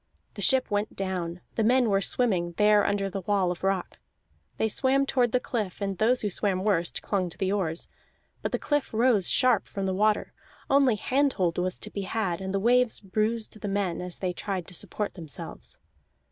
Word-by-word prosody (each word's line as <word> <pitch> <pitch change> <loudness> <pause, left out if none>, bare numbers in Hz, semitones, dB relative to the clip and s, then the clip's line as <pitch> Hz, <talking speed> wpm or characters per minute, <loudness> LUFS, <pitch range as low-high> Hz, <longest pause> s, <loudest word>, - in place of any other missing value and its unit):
The - - -7
ship 260 -4 +2
went 205 +1 -1
down; 180 -3 -3
the 225 - 0
men 245 +2 +4
were 195 -2 +2
swimming, 185 -6 +2
there 210 +2 +4
under 200 -1 0
the 195 0 -4
wall 190 -1 +1
of 180 - -7
rock. 195 -1 -1 0.6
They 220 - +1
swam 270 +5 +2
toward 250 -3 +1
the 250 - +3
cliff, 215 -7 -3
and 195 -1 -2
those 245 +3 +3
who 210 - 0
swam 190 0 0
worst 180 -5 0
clung 190 -3 -1
to 170 - -12
the 190 -1 0
oars. 175 -5 -1 0.5
But - - -2
the - - +1
cliff 290 -2 -1
rose 225 -5 +4
sharp 255 - +3
from 195 -1 -4
the 190 - 0
water, 210 +2 +1 0.4
only 270 -4 +5
hand 275 +6 +1
hold 175 -3 0
was 180 0 -1
to 215 - -7
be 200 - -4
had, 195 -3 -2
and 190 0 -3
the 195 - 0
waves 245 +2 +3
bruised 215 +2 -1
the 210 - -3
men 195 -4 -1
as 180 -1 -5
they 185 -2 -2
tried 185 -1 -4
to - - -11
support 205 +4 -3
themselves. 160 -6 -7
200 Hz, 200 wpm, -27 LUFS, 185-225 Hz, 0.6 s, only